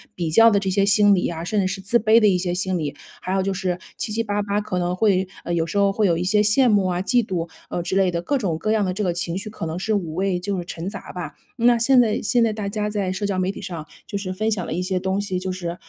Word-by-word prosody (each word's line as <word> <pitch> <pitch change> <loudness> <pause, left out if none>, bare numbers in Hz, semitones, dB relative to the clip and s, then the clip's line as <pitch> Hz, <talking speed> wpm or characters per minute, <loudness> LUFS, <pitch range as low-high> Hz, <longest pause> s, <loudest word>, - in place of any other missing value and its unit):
比 165 -3 -2
较 225 +6 +7
的 205 - +3
这 195 -1 -2
些 200 +1 +2
心 205 0 +5
理 180 - +1
啊， 165 -1 -5
甚 210 +4 -1
至 185 - 0
是 195 +1 -4
自 200 +5 +2
卑 220 +1 +5
的 215 - +4
一 195 - +4
些 180 -1 -2
心 185 0 -1
理， 150 -4 -3 0.3
还 185 - -4
有 195 - +2
就 195 - -1
是 185 -2 -2 0.2
七 215 - -3
七 230 +1 0
八 205 -1 -1
八 200 0 -1
可 195 -3 -3
能 175 0 -1
会 190 -2 +2 0.2
呃， 175 - -3
有 165 -1 +1
时 165 - -3
候 200 0 +4
会 210 -1 +2
有 170 -2 +2
一 175 - -1
些 210 +3 +3
羡 215 +5 +4
慕 205 -3 +3
啊、 180 -1 -1
嫉 240 +4 +2
妒， 175 -5 -3 0.2
呃， 175 - -2
之 180 +2 -2
类 195 -1 +3
的， 170 -1 -2
各 285 +6 0
种 180 -9 -1
各 215 +7 -1
样 220 -1 +2
的 185 - 0
这 210 - -2
个 180 -3 0
情 175 +1 -2
绪 205 +2 -5
可 205 - -6
能 160 - -4
是 215 +4 -1
五 170 -6 -2
味 190 0 0
就 195 +2 -3
是 175 - -4
陈 170 +2 -5
杂 200 -2 -9
吧。 175 -5 -6 0.3
那 240 +1 +5
现 250 +3 +4
在 220 -3 0
现 235 +2 +2
在 225 - +1
大 210 -2 -4
家 210 0 -2
在 200 -3 -2
社 205 +2 -3
交 195 -2 -1
媒 185 +1 0
体 - - -10
上 170 -4 -5 0.2
就 205 - -7
是 190 -2 -4
分 215 +4 -1
享 200 -4 -1
了 - - -4
一 180 - -1
些 185 0 -1
东 190 +1 -1
西， 190 -3 -2
就 185 0 -3
是， 175 -2 -4
195 Hz, 335 characters per minute, -22 LUFS, 180-210 Hz, 0.3 s, 较